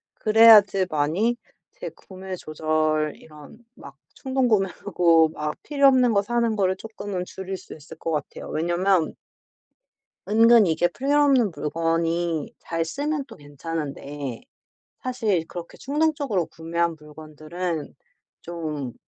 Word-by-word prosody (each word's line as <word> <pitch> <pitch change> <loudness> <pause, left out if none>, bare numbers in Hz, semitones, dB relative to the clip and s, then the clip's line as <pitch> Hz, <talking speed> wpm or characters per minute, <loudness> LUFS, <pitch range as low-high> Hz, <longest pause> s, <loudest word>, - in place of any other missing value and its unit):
그래야지 215 -4 +6
많이 170 +11 0 0.4
제 - - -7
구매 190 0 -9
조절 155 -1 -1
이런 155 +9 -15
막 140 0 -13 0.2
충동 265 -1 0
구매하고 180 -5 +2
막 150 -1 -4
필요 280 -2 +3
없는 255 -3 +4
거 200 - +3
사는 235 0 0
거를 190 -2 +1
조금은 200 -4 -6
줄일 190 +1 -6
수 - - -12
있을 145 - -13
것 165 - -3
같아요. 150 -2 -4
왜냐하면 175 +1 +1 1.1
은근 225 +1 +6
이게 175 0 +2
필요 285 +10 +1
없는 255 -8 +3
물건이 165 +1 -1
잘 165 0 -2
쓰면 285 - -3
또 - - -12
괜찮은데 145 -3 -6 0.6
사실 220 -10 -1
그렇게 175 -1 -9
충동적으로 285 - 0
구매한 170 +1 -2
물건들은 155 +2 -6 0.5
좀 155 -7 -5
175 Hz, 260 characters per minute, -24 LUFS, 155-225 Hz, 1.1 s, 그래야지